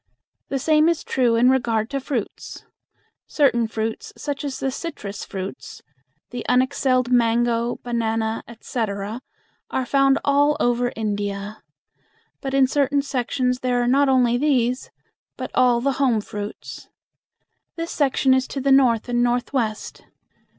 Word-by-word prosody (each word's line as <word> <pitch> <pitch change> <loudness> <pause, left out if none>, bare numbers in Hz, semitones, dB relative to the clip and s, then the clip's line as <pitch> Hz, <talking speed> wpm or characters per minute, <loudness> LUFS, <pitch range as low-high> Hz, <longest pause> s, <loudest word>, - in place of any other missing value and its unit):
The 275 - -1
same 310 +3 +3
is 335 - -1
true 245 -3 +1
in 245 +3 +5
regard 230 -3 0
to 275 - -1
fruits. 255 -5 -5 0.6
Certain 240 -6 +2
fruits, 220 0 -4
such 285 -1 -4
as 280 -2 -4
the 270 - -1
citrus 230 - -6
fruits, 190 0 -7 0.5
the 245 -1 -5
unexcelled 255 0 +2
mango, 235 0 +2
bananas, 225 -2 -1
etc., 220 -1 -4 0.5
are 260 - -1
found 275 +1 +3
all 285 +1 +3
over 245 0 +1
India; 205 -1 -3 0.8
but 270 0 -3
in 270 -1 +5
certain 280 +1 +1
sections 250 -1 -1
there 250 -1 0
are 240 - +1
not 275 +2 +3
only 245 -2 +3
these, 255 -3 +1 0.5
but - - -5
all 250 -2 +4
the 275 +2 +1
home 245 -5 +3
fruits. 205 0 -8 0.9
This 330 0 -4
section 270 -2 +2
is 260 0 +1
to 275 - -5
the 275 +1 +1
north 250 -5 +4
and 240 0 +1
northwest. 240 -2 -1
250 Hz, 135 wpm, -22 LUFS, 230-275 Hz, 0.9 s, in